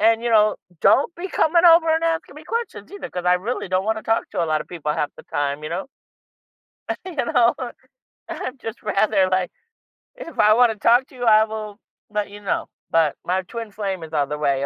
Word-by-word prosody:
And, 225 +1 +4
you 240 - -1
know, 215 -1 +4 0.2
don't 285 - +4
be 350 +3 -4
coming 340 0 +3
over 330 -1 +7
and 325 +1 0
asking 325 -3 -1
me 305 - -12
questions 465 +5 -4
either, 405 - -7
'cause 180 -1 -5
I 180 0 +5
really 210 +7 -3
don't 185 +1 0
want 220 +1 0
to - - -9
talk 225 0 0
to - - -1
a - - 0
lot 155 -1 0
of - - -8
people 150 -4 -3
half 150 -1 -1
the - - -12
time, 145 +1 -2
you 155 - -5
know. 180 +3 -3 1.2
You 365 -3 -7
know, 235 0 +3 0.8
I'm 255 +1 -5
just 225 -1 -7
rather, 205 -2 +2
like, 185 -1 0 0.7
if 330 - -10
I 215 0 +6
wanna 235 -1 +4
talk 240 +5 +3
to 265 - -18
you, 245 - -4
I 215 -1 +6
will 215 -1 -7 0.3
let 210 -1 -2
you 205 - -10
know, 200 - -2 0.2
but 160 -3 +3
my 185 +2 0
twin 225 +3 -7
flame 195 -4 -4
is 160 0 -10
on 145 -2 +1
the 150 - -3
way, 140 -2 0
215 Hz, 220 wpm, -22 LUFS, 180-245 Hz, 1.2 s, over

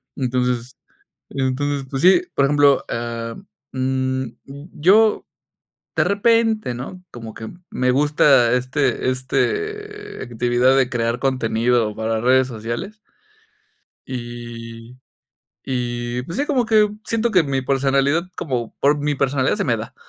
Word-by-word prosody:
entonces 125 -1 -1 0.5
entonces, 135 +1 -1
pues, 135 -1 -3
sí, 185 - +6
por 140 - +3
ejemplo, 145 -1 +4
ah, 115 -1 -4 0.4
mm, 130 0 -1 0.2
y 140 +4 -11
yo 200 +7 +4 0.7
de 155 - +3
repente, 220 - +2
¿no?, 135 +10 -8
como 115 -4 -9
que 110 - -8 0.2
me 125 0 +1
gusta, 140 -3 +4
este 130 +1 0
este, 420 - -3
actividad 120 +2 +2
de 130 -2 +2
crear 115 -1 -1
contenido 120 -3 +1
para 110 0 -1
redes 130 +2 +3
sociales. 120 - -5 1.1
Y 120 -1 -8 0.7
y 120 -1 -2
pues 165 +8 -7
sí, 285 - +1
como 265 -5 +1
que 215 -2 +4
siento 230 +1 0
que 185 -6 +4
mi 135 -2 -1
personalidad, 140 +4 +1
como 125 -7 -3
por 145 +2 +3
mi 145 0 0
personalidad 135 0 +1
se - - -1
me 120 - +2
da, 115 +4 -7
130 Hz, 130 wpm, -21 LUFS, 120-150 Hz, 1.1 s, sí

